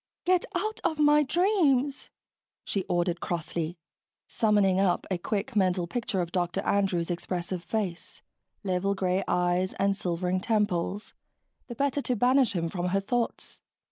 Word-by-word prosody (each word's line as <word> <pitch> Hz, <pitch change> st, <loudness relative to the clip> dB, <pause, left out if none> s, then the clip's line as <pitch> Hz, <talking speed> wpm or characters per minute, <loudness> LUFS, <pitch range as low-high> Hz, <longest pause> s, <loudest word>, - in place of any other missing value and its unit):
"Get 365 Hz, 0 st, +3 dB
out 430 Hz, +5 st, -1 dB
of 315 Hz, -, 0 dB
my 300 Hz, 0 st, +5 dB
dreams," 295 Hz, -5 st, +1 dB, 0.5 s
she 195 Hz, -2 st, -2 dB
ordered 175 Hz, 0 st, 0 dB
crossly, 170 Hz, 0 st, -3 dB, 0.5 s
summoning 205 Hz, -4 st, +2 dB
up 185 Hz, -3 st, +2 dB
a 185 Hz, -, 0 dB
quick 215 Hz, +7 st, -3 dB
mental 185 Hz, -3 st, +2 dB
picture 215 Hz, 0 st, -2 dB
of 170 Hz, -1 st, -4 dB
Dr. 180 Hz, +1 st, -1 dB
Andrews' 190 Hz, -4 st, 0 dB
expressive 175 Hz, 0 st, -3 dB
face, 190 Hz, -4 st, -4 dB, 0.4 s
level 195 Hz, +1 st, 0 dB
gray 190 Hz, 0 st, 0 dB
eyes, 180 Hz, +1 st, +1 dB
and 195 Hz, 0 st, +1 dB
silvering 180 Hz, 0 st, -1 dB
temples, 205 Hz, -2 st, -1 dB, 0.5 s
the 240 Hz, -, -7 dB
better 280 Hz, +2 st, 0 dB
to 250 Hz, -, -1 dB
banish 250 Hz, +1 st, +3 dB
him 170 Hz, -3 st, -1 dB
from 175 Hz, +1 st, -3 dB
her 195 Hz, +2 st, +1 dB
thoughts. 235 Hz, +4 st, -3 dB
195 Hz, 140 wpm, -28 LUFS, 180-245 Hz, 0.5 s, my